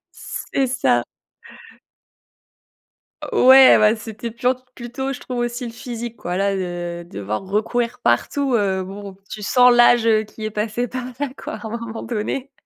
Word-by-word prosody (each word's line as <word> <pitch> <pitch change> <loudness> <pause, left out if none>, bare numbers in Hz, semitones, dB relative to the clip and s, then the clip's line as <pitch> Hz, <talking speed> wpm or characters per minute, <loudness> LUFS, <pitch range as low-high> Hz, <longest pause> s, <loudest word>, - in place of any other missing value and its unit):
C'est 270 -1 -3
ça. 240 - +1 2.3
Ouais, 260 +1 +8
bah, 215 +1 +4
c'était 220 +1 -7
plan 250 +3 0 0.2
plutôt 255 +3 -4
je 250 - -7
trouve 250 -1 -6
aussi 240 +1 -2
le 230 - -7
physique 235 -1 -7
quoi 180 -3 -4
là, 195 +1 +1
heu, 175 -2 -4
devoir 105 - -5
recourir 235 +5 -1
partout, 260 - +1
heu. 190 -3 +1
Bon, 195 0 -9
tu 210 - -7
sens 250 +3 +5
l'âge, 240 -1 +5
heu, 215 -1 +4
qui 215 +1 -10
est 215 - -2
passé 215 +3 -2
par 250 +1 -5
là 285 -1 -1
quoi - - -7
à 225 - -8
un - - -6
moment 230 -1 -7
donné. 245 +4 -3
230 Hz, 160 wpm, -21 LUFS, 200-245 Hz, 2.3 s, Ouais